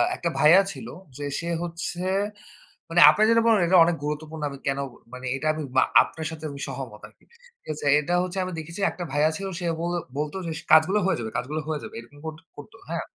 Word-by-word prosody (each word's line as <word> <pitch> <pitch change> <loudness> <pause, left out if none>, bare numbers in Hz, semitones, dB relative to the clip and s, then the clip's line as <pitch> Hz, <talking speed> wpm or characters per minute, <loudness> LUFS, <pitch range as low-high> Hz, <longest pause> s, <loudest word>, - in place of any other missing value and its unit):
একটা 170 - -2
ভাইয়া 165 +6 +7
ছিল 225 - -9 0.3
যে 145 - -6 0.2
সে 170 - -5 0.2
হচ্ছে, 175 +1 -5 0.9
মানে - - +4
আপনে 215 - +3
যেটা 230 0 +5
বলেন 225 -3 +5
এটা 185 +1 +5
অনেক 170 0 +1
গুরুত্বপূর্ণ 150 +1 -4
আমি 140 - -8
কেন 135 0 0 0.3
মানে 125 0 -8
এটা 155 +3 -3
আমি 155 - -5 0.2
মা - - +7 0.2
আপনার 160 0 -7
সাথে 160 -1 -8
আমি 140 - -9
সহমত 130 -5 -7
আরকি - - -26 0.3
ঠিক - - -46
আছে? 145 - -7
এটা 170 +4 -2
হচ্ছে 185 +1 -5
আমি 185 - -4
দেখেছি 165 +5 -7
একটা 175 - -6
ভাইয়া 150 +2 +3
ছিল 195 - -5
সে 175 - -4 0.2
বলে 175 +1 -1 0.2
বলত 150 +2 -2
যে - - -3
সে - - -13
কাজগুলো 180 +7 +6
হয়ে 190 -4 +1
যাবে। 110 -1 -5
কাজগুলো 150 +6 -3
হয়ে 155 -2 -1
যাবে। - - -9
এরকম 130 +5 -14
করতো 160 +1 -7
করত। 145 +10 -12 0.2
হ্যাঁ, 170 0 -2
160 Hz, 220 wpm, -25 LUFS, 145-175 Hz, 0.9 s, ভাইয়া